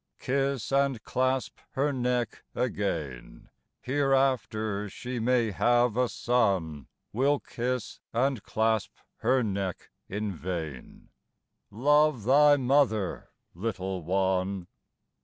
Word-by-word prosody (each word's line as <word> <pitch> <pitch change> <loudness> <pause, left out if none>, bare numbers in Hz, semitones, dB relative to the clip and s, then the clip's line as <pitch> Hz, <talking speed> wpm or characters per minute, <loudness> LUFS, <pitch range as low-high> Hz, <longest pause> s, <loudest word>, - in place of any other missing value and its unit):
Kiss 135 -2 -1
and 135 -4 +1
clasp 130 +1 -1
her 140 +2 +1
neck 125 -2 -1
again, 85 - -3 0.3
Hereafter 130 -7 +1
she 125 +5 -5
may 120 -1 +2
have 120 +2 +3
a 125 -1 +2
son 95 - 0 0.3
Will 140 +5 +2
kiss 125 -2 -4
and 130 0 +1
clasp 110 -2 0 0.2
her 125 +2 +2
neck 95 -4 -3 0.2
in 105 +1 -2
vain. 80 -6 -6 0.6
Love 145 +1 +3
thy 145 +4 +6
mother, 125 -7 +1 0.2
little 95 -1 -3
one! 95 +1 0
115 Hz, 100 wpm, -28 LUFS, 100-130 Hz, 0.6 s, thy